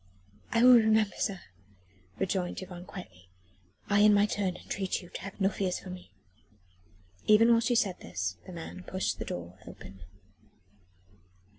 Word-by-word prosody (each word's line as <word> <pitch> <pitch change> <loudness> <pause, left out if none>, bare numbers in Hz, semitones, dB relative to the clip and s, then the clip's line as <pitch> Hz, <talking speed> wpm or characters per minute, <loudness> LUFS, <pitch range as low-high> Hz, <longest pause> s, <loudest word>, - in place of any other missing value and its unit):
"I 230 - +3
will 250 -1 +9
remember, 220 -3 +3
sir," 195 -4 -2 0.8
rejoined 180 - -2
Yvonne 180 -1 -9
quietly. 90 - -11 0.6
"I 205 0 +3
in 210 0 +6
my 205 0 +5
turn 195 -3 -1
entreat 190 -1 -3
you 175 - -13
to - - -8
have 200 +1 -9
no 195 - +3
fears 190 -2 -1
for 185 - -9
me." 180 - -10 1.2
Even 225 +2 +6
while 230 - +6
she 240 +1 +1
said 195 -5 +1
this, - - -4
the - - -8
man 170 +1 -8
pushed 185 +1 -2
the - - -4
door 90 +2 -7
open. 95 -1 -12
190 Hz, 155 wpm, -29 LUFS, 180-210 Hz, 1.2 s, will